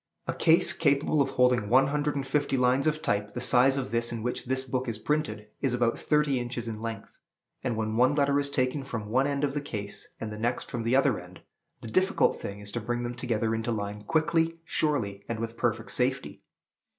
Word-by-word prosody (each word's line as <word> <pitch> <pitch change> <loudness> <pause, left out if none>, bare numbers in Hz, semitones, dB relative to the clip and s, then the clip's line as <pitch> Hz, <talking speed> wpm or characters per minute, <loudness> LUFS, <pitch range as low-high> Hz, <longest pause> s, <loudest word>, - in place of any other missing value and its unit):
A - - -2
case 165 0 +4
capable 145 -1 +2
of 135 - +1
holding 125 -5 +2
one 130 +2 +6
hundred 150 0 0
and 140 -1 -2
fifty 135 0 0
lines 125 +3 +3
of 155 0 0
type 105 -7 -1
the - - -2
size 130 +2 +4
of 125 -6 -3
this 115 0 0
in 115 -2 -4
which 125 - -2
this 130 +1 0
book 130 0 -2
is 115 -2 -1
printed 110 -5 -2
is 130 -3 +1
about 120 -1 +1
thirty 150 -3 +2
inches 120 -1 -4
in 110 -1 -5
length; 115 -3 -6 0.4
and 115 - -1
when 110 0 -1
one 130 +4 +4
letter 140 -1 +3
is 140 0 0
taken 130 +1 0
from 115 -6 -5
one 130 +5 +2
end 140 0 -1
of 140 -2 +1
the 145 - -2
case 105 -7 -5
and 110 -1 -5
the 105 - -7
next 120 +2 -2
from 120 - -2
the 115 +3 +1
other 135 -4 +3
end, 90 +1 -13 0.4
the - - -7
difficult 185 - +2
thing 100 0 -6
is 100 0 -9
to 120 - -3
bring 120 +2 -2
them 120 0 -3
together 115 -2 -1
into 115 +1 -1
line 105 -1 -3
quickly, 165 +6 +1
surely, 115 -12 -1
and 115 -1 -2
with 115 0 -4
perfect 115 -1 -1
safety. 130 +2 -1
125 Hz, 225 wpm, -28 LUFS, 115-140 Hz, 0.4 s, one